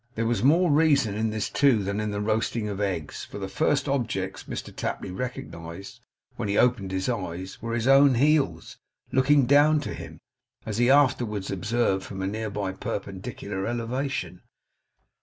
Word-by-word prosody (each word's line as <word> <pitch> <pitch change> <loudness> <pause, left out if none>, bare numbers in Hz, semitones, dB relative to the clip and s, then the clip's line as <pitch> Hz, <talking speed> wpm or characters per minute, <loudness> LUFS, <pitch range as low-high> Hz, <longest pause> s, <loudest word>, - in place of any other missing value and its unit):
There 115 - -1
was 120 0 0
more 165 +5 +4
reason 145 -8 +3
in 110 +2 0
this 110 -1 -2
too, 130 -7 +3
than 100 +2 -2
in 105 0 -1
the 105 0 -3
roasting 110 +1 0
of 100 -1 -4
eggs; 90 -7 -3
for - - -9
the 95 -1 -4
first 140 +10 0
objects 110 -9 -2
Mr - - -7
Tapley - - -4
recognized 95 -6 -7 0.4
when 105 - -3
he 100 - +1
opened 120 -6 +2
his 95 0 -2
eyes 95 -6 -4
were 115 0 -3
his 120 +1 -1
own 135 -1 +6
heels 135 - +1 0.3
looking 135 +1 +4
down 145 +3 +5
to - - -5
him, 80 -1 -9 0.5
as 110 0 -3
he 120 +1 +4
afterwards 120 -8 +2
observed, 100 +1 0
from 95 -1 -6
a - - -1
nearly 105 -2 -3
perpendicular 100 0 -5
elevation. 120 -6 -3
110 Hz, 165 wpm, -26 LUFS, 95-130 Hz, 0.5 s, own